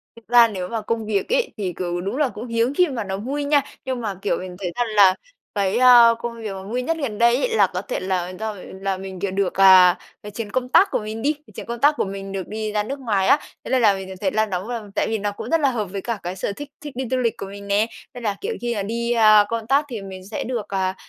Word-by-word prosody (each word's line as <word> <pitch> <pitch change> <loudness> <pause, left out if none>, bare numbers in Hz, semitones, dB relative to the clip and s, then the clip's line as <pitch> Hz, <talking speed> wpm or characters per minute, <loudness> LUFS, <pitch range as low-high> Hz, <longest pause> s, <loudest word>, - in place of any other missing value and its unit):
Thực 230 -1 -17
ra 240 0 +7
nếu 185 -5 -5
mà 225 +1 -3
công 225 0 -2
việc 205 -2 -1
ấy, - - +1
thì, 190 -4 -3
kiểu, 175 -1 -2
đúng 200 +8 -3
là 295 -3 +2
cũng 235 +1 -8
hiếm 230 +3 0
khi 360 +3 +3
mà 250 -6 -3
nó 190 -1 -4
vui 275 +7 -3
nha, 285 0 +3 0.2
nhưng 260 -2 -3
mà, 210 -4 -3
kiểu, - - 0
mình 180 -1 -7
thấy 180 -3 -3
rằng 245 -1 0
là 195 -2 +7 0.4
cái, 200 +1 +1
ơ, 240 -2 +7
công 235 0 -5
việc 215 -2 -4
mà 190 0 -7
vui 235 +6 -3
nhất 330 +6 -1
gần 250 -9 -3
đây 235 +1 +4
ấy 480 - 0
là - - +5
có - - -2
thể - - -4
là 185 -1 -2
do 220 0 -3
v - - -12 0.2
là 195 -1 -1
mình, 190 -1 -8
kiểu, 195 0 -2
được, 195 -1 0
à, 185 -2 +7 0.3
cái 210 - -8
chuyến 210 -1 -6
công 250 +1 -1
tác 390 +9 +5
của - - +1
mình 215 +1 -6
đi, 295 +5 +1 0.2
chuyến - - -7
công 235 0 -5
tác 290 +3 +5
của - - +1
mình 195 0 -6
được 190 -2 -4
đi 215 0 -4
ra 210 0 0
nước 275 +6 -5
ngoài 205 -7 0
á, 290 - +5 0.2
thế - - -7
nên 260 -2 +3
là 210 -3 +5
mình 190 -1 -7
được 190 - -7
thấy 190 -2 +1
là 215 +1 +2
nóng 190 0 -4
v - - -5 0.2
tại - - +1
vì 225 - -1
nó 205 0 -2
cũng 220 +3 -8
rất 330 - +3
là 285 -3 +3
hợp 220 -4 -2
với 195 +1 -6
cả 230 -1 -3
cái 180 +1 -4
sở 195 - -3
thích 290 +7 -8
thích 295 -3 -8
đi 260 - -2
du 260 - +2
lịch 235 -3 0
của - - -5
mình 200 +1 -10
nè. 205 +3 +2 0.3
Tức 245 - -8
là, 210 -3 -1
kiểu, 445 +4 -2
khi, 240 0 -1
ờ, 205 - -2
đi, 235 +3 -2
ơ, 215 -3 +6
công 230 -1 -3
tác 280 +3 +3
thì 230 -5 -5
mình 190 -1 -8
sẽ - - -3
được, 230 -4 -3
à, 190 -1 -1
215 Hz, 300 wpm, -22 LUFS, 195-245 Hz, 0.4 s, ra